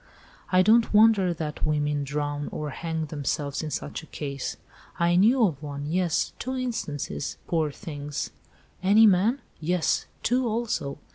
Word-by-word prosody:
I 185 0 +5
don't 225 +1 +4
wonder 210 -4 +6
that 155 -3 -4
women 150 -1 +1
drown 145 +1 -3
or 150 -1 -4
hang 160 +1 -3
themselves 145 -1 -2
in 155 - -4
such 145 +2 -4
a 160 - -14
case. 140 -3 -5 0.4
I 170 0 +3
knew 225 +6 +5
of 155 -8 -2
one—yes—two 160 - -2
instances—poor 160 - -2
things!" 145 -4 -5 0.5
"Any 205 +4 +6
men?" 215 +7 +3 0.2
"Yes; 170 +1 0 0.2
two 250 +1 +2
also. 220 -11 -2
165 Hz, 130 wpm, -26 LUFS, 145-210 Hz, 0.5 s, wonder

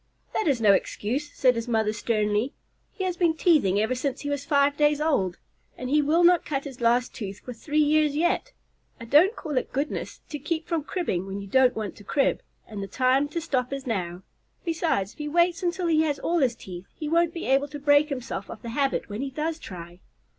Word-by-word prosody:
"That 435 - 0
is 275 -5 +2
no 210 -3 +6
excuse," 255 +9 -2
said 255 -1 +3
his 230 0 -4
mother 220 -2 +1
sternly. 215 +2 0 0.4
"He 380 - -5
has 365 -2 -1
been 340 -3 +2
teething 290 - +3
ever 220 +4 +1
since 255 +1 -3
he 290 - -3
was 285 -2 -2
five 280 0 +3
days 295 0 +3
old, 235 - +1 0.4
and 255 +1 -5
he 300 +1 +4
will 315 +4 +3
not 350 -1 +5
cut 275 -2 -2
his 265 -4 -9
last 235 +1 +2
tooth 200 -3 -7
for 250 - -7
three 295 +6 -4
years 300 -1 +3
yet. 345 +10 0 0.5
I 230 - -8
don't 325 - +5
call 295 -5 -1
it - - -9
goodness 280 +3 -3
to 295 - -5
keep 320 +3 -3
from 325 -4 -1
cribbing 195 - -2
when 195 +1 -5
you 200 - -7
don't 255 +5 +3
want 215 -3 -4
to 205 - -13
crib, 275 +7 +1 0.3
and 210 -2 -6
the 195 - -4
time 260 +6 +2
to 310 +3 -3
stop 265 -6 -1
is 275 0 -4
now. 185 -6 -3 0.4
Besides, 325 - 0
if - - -28
he 300 - -3
waits 345 +3 +2
until 360 0 -1
he 320 -2 +3
has 300 -3 0
all 340 0 0
his 255 -5 +2
teeth, 185 -3 -9
he 305 - -5
won't 335 +1 +2
be 335 - -6
able 270 +2 +2
to 295 0 -7
break 290 +1 +4
himself 250 -7 -5
of 220 - -9
the 235 - -5
habit 275 +3 0
when 210 +3 -5
he 275 - -2
does 310 +4 -3
try." 175 - -9
275 Hz, 225 wpm, -26 LUFS, 225-310 Hz, 0.5 s, no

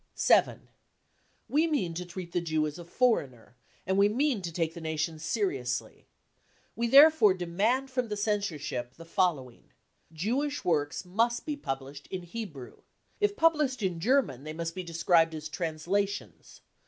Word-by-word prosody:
7. - - +3 0.8
We 310 +4 +2
mean 260 - -1
to 180 +2 -5
treat 175 0 -8
the 175 - 0
Jew 155 -2 0
as 150 +3 -5
a 170 - -9
foreigner, 140 - 0 0.3
and 190 +2 +1
we 200 +1 +5
mean 255 0 +1
to 170 -2 -5
take 165 -1 -1
Hie 170 - -8
nation 160 0 -3
seriously. 145 - -2 0.7
We 235 +1 0
therefore 275 -6 +7
demand 210 +10 0
from 250 -2 -1
the 210 -1 -4
censorship 170 - -2
the 165 - -12
following: 165 - -1 0.4
Jewish 245 - -2
works 155 0 0
must 230 +6 0
be 300 - -2
published 140 - -6
in 185 -1 -5
Hebrew. 175 - -8 0.4
If 415 -1 +1
published 300 -7 +2
in 180 -3 -1
German, 210 - +1
they 155 +1 -7
fhust 165 0 -4
be 185 - -4
described 165 -1 +2
as 155 0 -6
translations. 175 +6 -3
180 Hz, 155 wpm, -29 LUFS, 155-230 Hz, 0.8 s, therefore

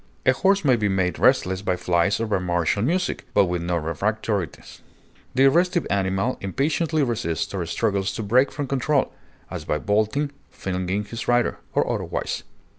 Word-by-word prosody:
A - - +6
horse 195 -2 +2
may 130 -3 +5
be 105 -3 0
made 95 -2 0
restless 95 0 +3
by 95 -2 0
flies 90 +2 +1
or 115 - 0
by 105 -3 0
martial 90 +2 0
music, 175 - -1
but 100 - +6
with 90 -1 -2
no 85 +1 -1
refractoriness; 95 - -3 0.6
the 135 +1 +6
restive 175 +4 +2
animal 95 +5 0
impatiently 150 - 0
resists 85 -10 -2
or 95 -3 -2
struggles 100 +1 0
to 110 - -3
break 125 +7 +3
from 145 +1 -3
control, 135 +1 0 0.4
as - - -5
by 75 - -1
bolting, 110 - 0 0.2
flinging 95 +2 -3
his 115 +3 -6
rider, 120 0 +2 0.2
or - - +2
otherwise. - - -2
105 Hz, 165 wpm, -23 LUFS, 95-135 Hz, 0.6 s, A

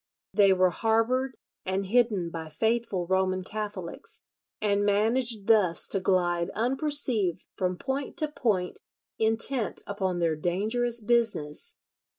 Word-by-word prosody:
They 200 -1 +5
were 185 -1 +3
harboured 235 +6 0 0.3
and 190 +1 -2
hidden 205 -5 +1
by 160 -1 -6
faithful 220 0 -1
Roman 185 0 0
Catholics, 205 -4 -6 0.4
and 205 -1 +1
managed 220 +2 +1
thus 205 -7 +4
to 195 - +4
glide 175 -2 +1
unperceived 250 - 0
from 185 -1 -1
point 270 - -4
to 310 -3 +1
point 215 -11 -1 0.4
intent 225 +2 +1
upon 190 -3 -2
their 165 -2 +1
dangerous 220 +9 0
business. 215 -10 0
205 Hz, 120 wpm, -27 LUFS, 185-235 Hz, 0.4 s, They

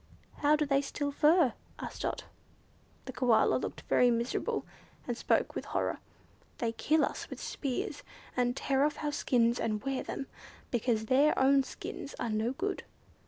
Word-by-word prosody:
"How 295 +1 +4
do 300 0 +1
they 275 -1 +2
steal 285 +1 -3
fur?" 300 -1 +4 0.2
asked - - -7
Dot. - - -2 0.8
The 260 - -6
Koala 245 -3 +3
looked - - -5
very 250 - +4
miserable, 235 +1 -1 0.4
and 240 - -1
spoke - - +1
with - - -4
horror. - - -1 0.6
"They 230 -1 0
kill 305 +6 +2
us - - -6
with - - -7
spears, 270 -4 -3 0.3
and 245 0 +1
tear 270 0 +2
off 300 +1 0
our 295 - 0
skins 240 -4 +2
and 215 -2 -1
wear 270 -1 -1
them, 275 - -5 0.5
because 230 -2 +1
their 275 +6 +4
own 275 +1 +5
skins 275 +1 -7
are 230 - -2
no 220 +3 0
good." 385 +7 -2
265 Hz, 165 wpm, -31 LUFS, 240-290 Hz, 0.8 s, own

